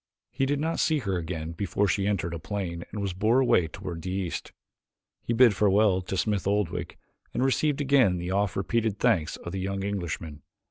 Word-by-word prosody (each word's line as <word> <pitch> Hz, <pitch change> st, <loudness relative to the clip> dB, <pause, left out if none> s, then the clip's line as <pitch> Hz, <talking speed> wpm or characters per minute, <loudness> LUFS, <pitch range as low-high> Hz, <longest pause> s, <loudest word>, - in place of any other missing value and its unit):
He 135 Hz, +1 st, 0 dB
did 145 Hz, +1 st, 0 dB
not 160 Hz, +2 st, -1 dB
see 155 Hz, -1 st, +2 dB
her 100 Hz, -9 st, -2 dB
again 80 Hz, -1 st, -4 dB
before 100 Hz, +3 st, 0 dB
she 100 Hz, +1 st, +1 dB
entered 85 Hz, -5 st, -1 dB
a 85 Hz, -, -4 dB
plane 85 Hz, 0 st, -4 dB
and 105 Hz, -, -5 dB
was 95 Hz, -2 st, -2 dB
borne 110 Hz, +8 st, +3 dB
away 90 Hz, -9 st, +3 dB
toward 85 Hz, 0 st, -7 dB
the 90 Hz, -, -5 dB
east. 95 Hz, -2 st, -3 dB, 0.7 s
He -, -, -4 dB
bid 115 Hz, -2 st, +6 dB
farewell 100 Hz, -1 st, +3 dB
to 95 Hz, +1 st, -4 dB
Smith 100 Hz, +2 st, 0 dB
Oldwick 90 Hz, -4 st, -1 dB, 0.4 s
and 130 Hz, -, +2 dB
received 145 Hz, +2 st, +1 dB
again 130 Hz, -10 st, +4 dB
the 90 Hz, +1 st, -4 dB
oft 100 Hz, 0 st, 0 dB
repeated 110 Hz, +2 st, 0 dB
thanks 95 Hz, -12 st, +2 dB
of 85 Hz, -, -8 dB
the 95 Hz, -, -3 dB
young 95 Hz, +1 st, -2 dB
Englishman. 85 Hz, -6 st, -4 dB
100 Hz, 195 wpm, -27 LUFS, 90-110 Hz, 0.7 s, bid